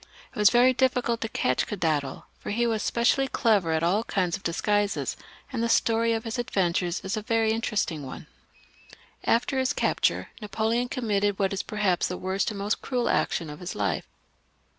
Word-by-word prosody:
It - - -6
was 210 -1 +7
ver^w^ 250 +1 +5
^^ - - -31
J 260 -1 +5
cult 240 -2 -2
to 225 - -2
catch 125 -10 0
Cadondal, 155 -8 -1 0.2
for - - -7
he 235 +3 +1
was 225 -2 0
specially 250 +3 +2
clever 210 -9 +2
akjtion 175 +5 +2
^ - - -31
kinds 180 -3 0
of 205 - -8
disguises, 205 +4 0 0.4
and 235 - -1
the 235 - 0
story 230 0 +3
of 225 0 -2
his 225 +1 -4
adventures 180 -7 0
is\ 190 +4 -2
gQ 215 -1 -5
\ - - -31
very 225 -1 +2
interesting 205 -8 -1
one. 130 - -7
\q^ - - -25 0.3
After 255 +3 +2
his 260 -1 +1
capture, - - 0
Napoleon 220 +4 -1
committed 205 -6 0
what 195 -1 0
is 195 - -1
perhapsVj 205 -4 0
the 180 - -4
worst 190 +3 -1
and 210 - -6
most 200 +2 -1
cruel 250 -2 -1
action 165 - 0
of 150 0 -8
his 180 - -6
life. 100 -5 -1
210 Hz, 200 wpm, -26 LUFS, 185-230 Hz, 0.4 s, was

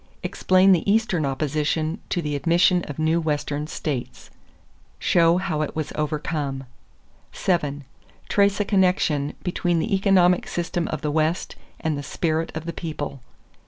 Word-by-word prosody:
Explain 185 +1 +3
the 185 +2 +3
Eastern 200 -9 +1
opposition 155 +5 -1
to 175 - -1
the 150 -1 -2
admission 175 +4 +3
of 145 - -7
new 160 +2 +2
Western 150 -1 -2
states. 140 -6 -5 0.7
Show 170 0 +3
how 160 -4 -1
it 155 - -3
was 155 -2 -3
overcome. 150 -2 -2 0.7
7. 145 -6 -1 0.4
Trace 200 0 +2
a 205 - +1
connection 180 -7 +1
between 175 -1 0
the 195 +6 -1
economic 190 -2 +3
system 175 -1 -2
of 155 - -4
the 150 - -1
West 160 +3 0 0.2
and 155 -3 -1
the - - -3
spirit 160 +3 -1
of 160 0 -5
the 170 - -4
people. 150 -5 -5
160 Hz, 145 wpm, -23 LUFS, 150-180 Hz, 0.7 s, Explain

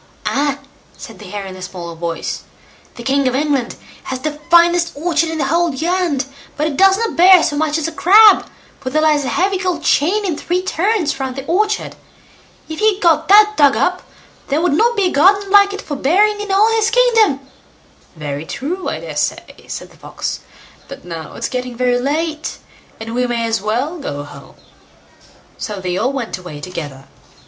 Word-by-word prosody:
"Ah!" 280 0 0 0.4
said - - -11
the - - -11
Hare 205 -1 -5
in 190 -1 -8
a 185 - -11
small 180 -2 -7
voice; 165 0 -4 0.5
"the 240 - -9
king 275 +1 +1
of 255 - 0
England 280 -3 -1 0.3
has 260 - -4
the 300 0 -4
finest 345 0 +4
orchard 325 +1 0
in 320 - -4
the 285 - 0
whole 335 +4 +1
land, 330 -2 -1 0.3
but 300 - 0
it 310 -2 -2
does 385 +4 +5
not 455 +1 -2
bear 365 +1 +7
so 290 - -1
much 305 +1 0
as 320 - -2
a - - -4
crab, 410 +5 +6 0.3
for 255 - -5
there 310 +4 +1
lies 300 -2 +3
a - - -2
heavy 380 +1 0
gold 360 -4 -2
chain 395 +8 +2
in 350 -5 -1
three 355 +4 -2
turns 375 -4 -1
round 265 -1 -3
the 270 0 -6
orchard. 420 +6 -1 0.7
If 315 -1 -7
he 430 -2 +2
got 325 -4 +2
that 420 +2 +6
dug 285 -5 +4
up, 365 0 0 0.5
there 290 +2 0
would 345 -2 +1
not 465 +8 +2
be 405 - +2
a - - -6
garden 390 +6 +3
like 400 0 +6
it 400 - -6
for 290 - -5
bearing 410 +10 +2
in 410 -1 -5
all 415 +3 +4
his 445 -1 +2
kingdom." 455 - +3 0.7
"Very 145 -2 -5
true, 325 +8 -4
I - - -5
dare - - -8
say", - - -4
said - - -7
the - - -20
Fox; - - -5 0.5
"but - - -11
now 165 -3 -7
it's - - -3
getting 250 -1 -5
very 245 0 +1
late, 310 +4 -2 0.4
and 225 +1 -7
we 250 +1 0
may 235 -1 -1
as 225 -3 -1
well 250 - -2
go 145 - -5
home." 145 - -13 1.0
So 210 -2 -5
they 180 -1 -3
all 245 +8 0
went 250 -8 -4
away 180 -5 -9
together. 145 -5 -7
305 Hz, 195 wpm, -17 LUFS, 250-370 Hz, 1.0 s, bear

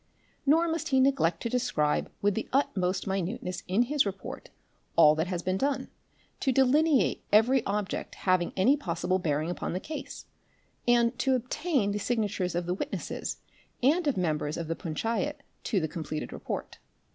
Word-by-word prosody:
Nor 325 +4 +5
must 325 0 -2
he 265 -2 +3
neglect 260 -11 +2
to - - 0
describe 230 -12 0
with 205 0 +3
the 225 - -4
utmost 190 -9 +1
minuteness 190 0 -3
in 195 +6 +3
his 285 +3 +2
report 195 -1 -6 0.5
all 155 -2 +7
that 160 +3 -1
has 175 -2 -3
been 185 +1 0
done, 280 0 -1 0.5
to 270 - +1
delineate 270 +3 +3
every 235 +4 +5
object 200 -1 -2
having 185 -2 +1
any 245 +10 +5
possible 185 - -1
bearing 155 -1 0
upon 175 - -3
the 180 - -1
case, 295 +6 -7 0.6
and 240 0 +3
to 265 +1 +3
obtain 255 - 0
the 205 - -2
signatures 205 -6 -1
of 175 0 -1
the 175 - 0
witnesses 185 - -4 0.5
and 310 +5 +3
of 280 - +1
members 155 -4 -1
of 165 - -4
the 165 - -1
punchayat 180 +10 -2 0.2
to 205 - +1
the 160 - -1
com 160 +1 -5
pleted 155 0 -4
report. - - -5
205 Hz, 170 wpm, -29 LUFS, 175-265 Hz, 0.6 s, all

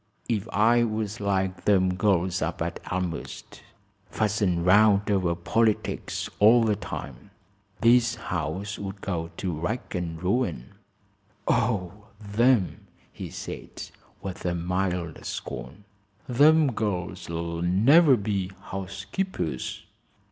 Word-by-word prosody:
"If 110 -2 -1
I 115 +3 +4
was 110 -1 -2
like 95 -2 -1
them 95 -3 +3
girls 95 -2 +1
up - - -2
at - - -4
Elmhurst, 90 -3 -4 0.5
fussin' 100 -5 0
round 105 +2 +5
over 90 -4 +1
politics 110 +5 0
all 115 +3 +7
the 110 -2 +2
time, 65 0 -7 0.5
this 120 0 +5
house 95 0 -4
would 100 0 -6
go 85 -4 -3
to 90 -3 -2
rack 85 +11 -3
an' 85 -2 -3
ruin." 90 - -1 0.7
"Oh, 105 -2 0
them!" 110 0 +1 0.3
he - - -7
said, - - -8 0.3
with 95 -2 -6
mild 90 -1 -2
scorn. 70 +12 -6 0.4
"Them 145 +3 +5
girls 90 -5 -3
'll 85 0 -3
never 130 - +5
be 100 -3 -2
housekeepers." 95 - -4
95 Hz, 110 wpm, -26 LUFS, 90-110 Hz, 0.7 s, all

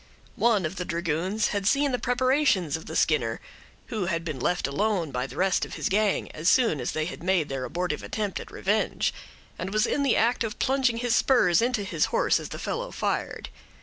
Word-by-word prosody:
One 220 -6 +2
of 180 +5 -4
the 180 - -2
dragoons 170 +4 -1
had 200 -1 -1
seen 280 +3 +3
the 250 - -1
preparations 245 - +2
of 160 - -7
the 160 - -6
Skinner—who 150 - -2
had 165 -2 -2
been 155 -5 -4
left 175 +7 0
alone 175 +2 0
by 125 +1 -2
the - - -11
rest 190 0 +1
of - - -5
his - - -2
gang, 205 +1 +1
as 155 +3 0
soon 225 - +3
as 120 - -2
they 155 0 -1
had 170 - -7
made 180 -3 +1
their 135 -2 -3
abortive 170 +3 -2
attempt 210 -3 -3
at - - -9
revenge—and 200 -2 -3
was 215 +2 +2
in 285 - 0
the 275 -4 +3
act 235 +2 +2
of 220 -2 -4
plunging 260 -3 +1
his 235 -1 +1
spurs 185 -11 +4
into 240 -3 0
his 195 - 0
horse - - +2
as - - -7
the - - -6
fellow - - -3
fired. - - -3
195 Hz, 205 wpm, -26 LUFS, 165-235 Hz, -, spurs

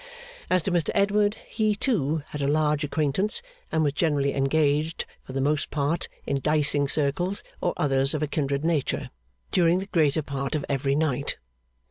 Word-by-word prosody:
As 185 -2 +3
to 190 - -1
Mr 170 -4 +1
Edward, 205 +1 +3
he, 215 -1 +1
too, 160 - 0
had 150 - -5
a 140 - +1
large 150 0 +2
acquaintance, 155 - 0 0.3
and 160 - +2
was 145 -2 +1
generally 145 -3 +1
engaged 150 +3 +1 0.2
(for 130 - -10
the 135 - -1
most 145 +2 0
part, 150 +3 -1 0.2
in 140 -1 -1
diceing 145 -1 +2
circles, 160 +7 -1 0.2
or 175 - +1
others 135 0 +3
of 155 - -1
a - - 0
kindred 140 0 -1
nature), 160 -5 -1 0.4
during 175 -1 +4
the 190 - -3
greater 155 -6 +2
part 140 +1 -3
of 150 - -2
every 140 0 0
night. 140 -3 0
150 Hz, 170 wpm, -26 LUFS, 140-170 Hz, 0.4 s, during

